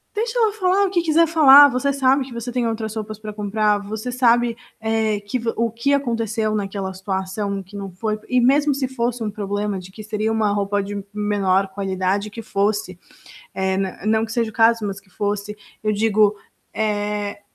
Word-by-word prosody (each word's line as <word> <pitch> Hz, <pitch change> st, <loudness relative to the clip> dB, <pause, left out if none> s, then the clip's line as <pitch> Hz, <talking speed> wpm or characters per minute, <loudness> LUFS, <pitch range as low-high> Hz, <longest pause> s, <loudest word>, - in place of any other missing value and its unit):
deixa 455 Hz, +3 st, -2 dB
ela 440 Hz, -2 st, +3 dB
falar 390 Hz, -1 st, +2 dB
o 385 Hz, -, -1 dB
que 350 Hz, -3 st, +2 dB
quiser 330 Hz, 0 st, +4 dB
falar, 290 Hz, -3 st, +8 dB
você 255 Hz, +2 st, 0 dB
sabe 270 Hz, 0 st, +2 dB
que 260 Hz, -1 st, -11 dB
você 235 Hz, +1 st, -5 dB
tem 245 Hz, -1 st, -1 dB
outras 220 Hz, -1 st, -3 dB
roupas 215 Hz, -1 st, -5 dB
para 215 Hz, -1 st, -7 dB
comprar, 210 Hz, 0 st, +1 dB
você 215 Hz, +4 st, -5 dB
sabe, 240 Hz, -1 st, +3 dB, 0.2 s
eh, 220 Hz, -1 st, 0 dB
que 205 Hz, +5 st, -3 dB
vo 230 Hz, 0 st, -1 dB
o 230 Hz, -1 st, +1 dB
que 235 Hz, +5 st, -1 dB
aconteceu 230 Hz, -5 st, 0 dB
naquela 195 Hz, -2 st, -3 dB
situação, 190 Hz, +1 st, -3 dB
o -, -, -8 dB
que 190 Hz, +3 st, -15 dB
não 195 Hz, -1 st, -6 dB
foi 215 Hz, +4 st, -3 dB
E 255 Hz, -, +3 dB
mesmo 280 Hz, +3 st, +3 dB
se 270 Hz, -1 st, -1 dB
fosse 240 Hz, -2 st, -2 dB
um 210 Hz, -, -2 dB
problema 205 Hz, -1 st, -3 dB
de 185 Hz, +1 st, -12 dB
que 215 Hz, +3 st, -10 dB
seria 215 Hz, +1 st, -2 dB
uma 220 Hz, -2 st, +1 dB
roupa 205 Hz, 0 st, 0 dB
de 200 Hz, 0 st, -5 dB
menor 200 Hz, -2 st, +1 dB
qualidade 190 Hz, +1 st, -2 dB
que 225 Hz, +2 st, -9 dB
fosse, 200 Hz, -2 st, -1 dB, 0.6 s
eh, 190 Hz, 0 st, 0 dB
nã 190 Hz, -1 st, -2 dB
não 220 Hz, +1 st, +2 dB
que 220 Hz, -, -9 dB
seja 230 Hz, -1 st, 0 dB
o -, -, -24 dB
caso, 225 Hz, 0 st, +3 dB
mas 195 Hz, -1 st, -5 dB
que 190 Hz, -, -28 dB
fosse, 205 Hz, +2 st, -3 dB, 0.3 s
eu 215 Hz, -, +1 dB
digo, 210 Hz, 0 st, +2 dB, 0.4 s
eh, 205 Hz, -1 st, -2 dB
215 Hz, 200 wpm, -21 LUFS, 205-240 Hz, 0.6 s, falar